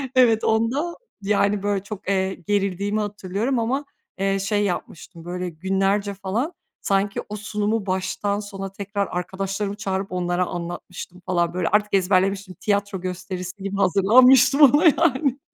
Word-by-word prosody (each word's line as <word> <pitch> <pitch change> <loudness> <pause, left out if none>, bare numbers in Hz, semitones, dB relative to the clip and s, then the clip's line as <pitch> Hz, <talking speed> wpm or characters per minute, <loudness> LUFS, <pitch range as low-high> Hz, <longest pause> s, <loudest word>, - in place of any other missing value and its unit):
Evet, 235 -4 +5
onda, 240 +10 +1 0.3
yani, 200 0 +1
böyle 205 -2 0
çok, 200 -2 -7
eee, 190 -1 +1
gerildiğimi 200 +1 0
hatırlıyorum 205 +4 -2
ama, 260 +6 -1 0.3
eee, 195 0 +1
şey 205 +1 0
yapmıştım: 175 -2 -5
Böyle 180 +1 -4
günlerce 195 +4 0
falan 200 - -2 0.3
sanki 195 0 0
o 210 - -4
sunumu 210 0 -2
baştan 190 +2 -1
sona 195 -2 -6
tekrar 200 +1 -3
arkadaşlarımı 195 +3 -3
çağırıp 195 -2 -3
onlara 180 0 0
anlatmıştım 175 +1 -7
falan 175 -2 0
böyle 180 -2 -1
artık 210 +2 +1
ezberlemiştim 190 0 +1
tiyatro 200 -2 -1
gösterisi 185 +1 -6
gibi 195 0 -3
hazırlanmıştım 250 - +5
ona 290 +3 +7
yani. 285 -4 +3
200 Hz, 135 wpm, -23 LUFS, 185-210 Hz, 0.3 s, ona